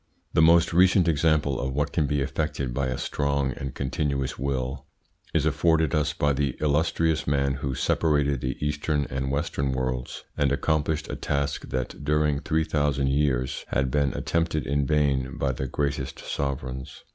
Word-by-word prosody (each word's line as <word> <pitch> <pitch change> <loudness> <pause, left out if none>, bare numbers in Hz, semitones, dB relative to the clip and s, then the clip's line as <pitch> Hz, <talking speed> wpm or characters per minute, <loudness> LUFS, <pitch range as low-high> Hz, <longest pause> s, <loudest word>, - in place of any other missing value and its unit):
The - - +4
most 85 +1 +5
recent 90 0 +5
example 75 -3 +2
of 65 0 -3
what 75 0 0
can 75 -4 +1
be 75 0 0
effected 70 -2 -2
by 70 +2 0
a 65 -1 -2
strong 70 -2 0
and 70 +1 -6
continuous 70 -1 -1
will 65 +1 -2 0.4
is 80 -2 +1
afforded 80 -1 +2
us 75 -2 +2
by 75 -2 +1
the 70 -2 -1
illustrious 80 +1 +1
man 70 -1 +2
who 70 -2 -2
separated 70 -4 +1
the 65 +1 -2
Eastern 75 0 0
and 65 0 -2
Western 70 -2 -1
worlds, 65 -1 -3
and 70 -2 +1
accomplished 75 +2 0
a - - -3
task 70 0 -2
that 65 +2 -4
during 75 0 +2
three 80 +1 0
thousand 70 -3 0
years 65 -3 0
had 65 -2 0
been 70 0 +2
attempted 80 -2 -1
in 70 0 0
vain 70 -4 +1
by 70 - 0
the 65 +1 -4
greatest 70 -1 -2
sovereigns. 65 -2 -4
70 Hz, 165 wpm, -26 LUFS, 65-75 Hz, 0.4 s, most